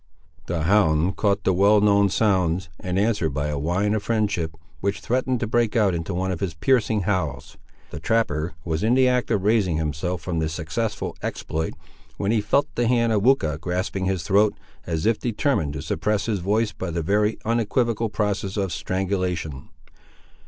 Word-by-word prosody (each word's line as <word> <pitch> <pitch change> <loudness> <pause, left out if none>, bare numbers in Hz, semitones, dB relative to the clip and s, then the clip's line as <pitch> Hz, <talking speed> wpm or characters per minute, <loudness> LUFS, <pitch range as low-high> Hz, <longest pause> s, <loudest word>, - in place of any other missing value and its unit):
The 85 -2 -1
hound 90 -2 +3
caught 100 -1 +1
the 95 - +2
well 100 +3 +5
known 100 -1 +4
sounds, 95 -4 +1
and 90 0 -3
answered 100 -8 +1
by 75 0 -1
a 75 -1 -2
whine 90 +7 0
of 110 - 0
friendship, 105 -7 -1 0.2
which 100 +3 -1
threatened 125 +3 0
to - - +1
break 120 0 +1
out 105 -5 +3
into 85 +2 -3
one 95 +1 -1
of 90 - -3
his 90 -5 -3
piercing 110 +2 +2
howls. 95 -1 -2 0.4
The 75 - -6
trapper 85 -6 0
was 80 -2 -1
in 115 +3 +3
the 130 0 +5
act 125 -1 +1
of 95 - +1
raising 100 -6 +2
himself 80 +2 -2
from 85 -2 -2
this 80 0 -1
successful 90 +7 -3
exploit, 80 +1 -3 0.4
when 100 +1 0
he 110 -2 +2
felt 135 +7 +2
the 120 -1 0
hand 115 -1 +2
of 105 - +2
Weucha 95 - +2
grasping 90 +2 -2
his 95 -3 -1
throat, 100 +4 +3 0.3
as 80 0 -2
if 115 -1 +2
determined 115 - 0
to 75 -1 -5
suppress 100 +6 -1
his 110 -4 -1
voice 105 +4 +1
by 95 - -5
the 85 0 -2
very 105 +5 +1
unequivocal 115 0 0
process 105 -1 -2
of 95 -4 -1
strangulation. 90 -7 -2
100 Hz, 180 wpm, -23 LUFS, 85-110 Hz, 0.4 s, well